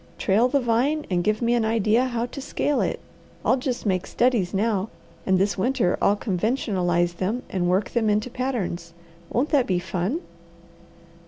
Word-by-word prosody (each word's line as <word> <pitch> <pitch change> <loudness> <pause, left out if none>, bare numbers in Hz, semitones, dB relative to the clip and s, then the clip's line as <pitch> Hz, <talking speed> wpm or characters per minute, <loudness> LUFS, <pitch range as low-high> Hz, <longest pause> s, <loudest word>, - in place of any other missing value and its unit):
"Trail 215 +5 +3
the 280 +2 +2
vine 260 +6 +1
and 175 -1 +1
give 215 +3 0
me 235 +1 +2
an 240 -2 +2
idea 220 +2 +2
how 240 -2 -1
to 275 +3 -8
scale 290 +1 0
it. - - -1 0.5
I'll - - +4
just 255 -2 -3
make 185 -3 0
studies 235 -7 +1
now, 205 0 0 0.4
and 190 -1 +4
this 195 +1 0
winter 195 -4 +1
I'll 205 - +4
conventionalize 180 -5 0
them 215 +8 -2
and 175 -2 0
work 190 +2 +1
them 225 -3 +1
into 210 +4 0
patterns. 195 -11 -3 0.4
Won't 265 +6 0
that 280 -5 +3
be 185 - +1
fun?" 185 - -2
215 Hz, 170 wpm, -24 LUFS, 185-250 Hz, 0.5 s, I'll